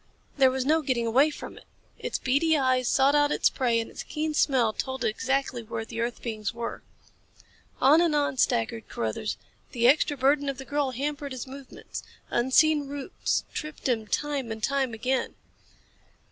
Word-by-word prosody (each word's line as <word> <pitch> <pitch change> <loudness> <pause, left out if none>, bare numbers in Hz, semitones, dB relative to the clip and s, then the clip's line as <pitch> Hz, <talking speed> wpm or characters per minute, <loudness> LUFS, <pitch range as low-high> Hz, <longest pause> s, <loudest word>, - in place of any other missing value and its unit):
There 270 -2 +5
was 260 0 -2
no 315 +3 +3
getting 250 -5 0
away 260 +7 +4
from 300 - -9
it. - - -20 0.3
Its - - -2
beady 305 +5 +2
eyes 255 -2 +2
sought 275 +1 +4
out 290 0 +3
its - - +3
prey 240 -4 +1
and 225 - -3
its - - -7
keen 310 0 -3
smell 255 -7 +2
told 260 0 -3
it - - +3
exactly 260 +2 -1
where 225 0 -5
the 230 0 -5
earth 235 +1 -3
beings 220 -1 -3
were. 235 0 -5 1.0
On 300 +5 +6
and 335 -3 +2
on 285 -2 0
staggered 115 - 0
Carruthers. 115 - -3 0.4
The 240 -2 +3
extra 290 +1 +3
burden 280 +2 +2
of 275 - -4
the 270 - -8
girl 285 -1 0
hampered 280 +2 -3
his 255 - -5
movements. 270 0 -9 0.3
Unseen 285 +4 +3
roots 285 +5 -2
tripped 305 -2 -5
him 225 -4 0
time 280 0 -2
and 220 -1 -6
time 270 -3 0
again. 255 +4 -1
265 Hz, 175 wpm, -27 LUFS, 235-285 Hz, 1.0 s, On